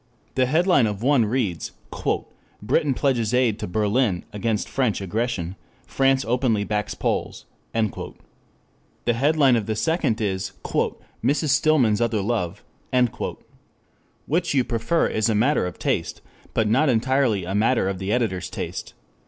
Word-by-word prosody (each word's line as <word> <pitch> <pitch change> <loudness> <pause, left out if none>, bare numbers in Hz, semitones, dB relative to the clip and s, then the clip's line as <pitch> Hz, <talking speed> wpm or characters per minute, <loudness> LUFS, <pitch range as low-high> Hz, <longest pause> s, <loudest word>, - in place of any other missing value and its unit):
The 130 -1 +2
headline 160 -3 +3
of 105 +1 -4
one 135 -3 +4
reads: 105 -7 -2 0.9
"Britain 135 +6 +1
pledges 125 -5 +1
aid 120 -4 +2
to - - -4
Berlin 105 0 +1
against 105 0 -1
French 125 -6 0
aggression; 100 -2 -2 0.3
France 135 0 +2
openly 115 -3 +1
backs 105 -1 -2
Poles." - - -2 0.3
The 115 +2 -5
headline 140 +1 +3
of 110 -3 -1
the 110 - -1
second 130 - 0
is 95 -3 -2 0.7
"Mrs. 150 +2 +1
Stillman's 130 -6 +3
Other 115 -3 +1
Love." 100 -6 -2 1.6
Which 170 0 0
you 130 - +4
prefer 120 +8 0
is 110 +1 0
a 110 - +2
matter 120 -2 +2
of 90 - -7
taste, - - -2 0.3
but 110 - +2
not 130 +8 +3
entirely 125 -4 +2
a 95 - -3
matter 110 0 +2
of 95 -1 -2
the 95 +1 -2
editor's 110 -7 0
taste. - - -6
115 Hz, 135 wpm, -23 LUFS, 105-135 Hz, 1.6 s, one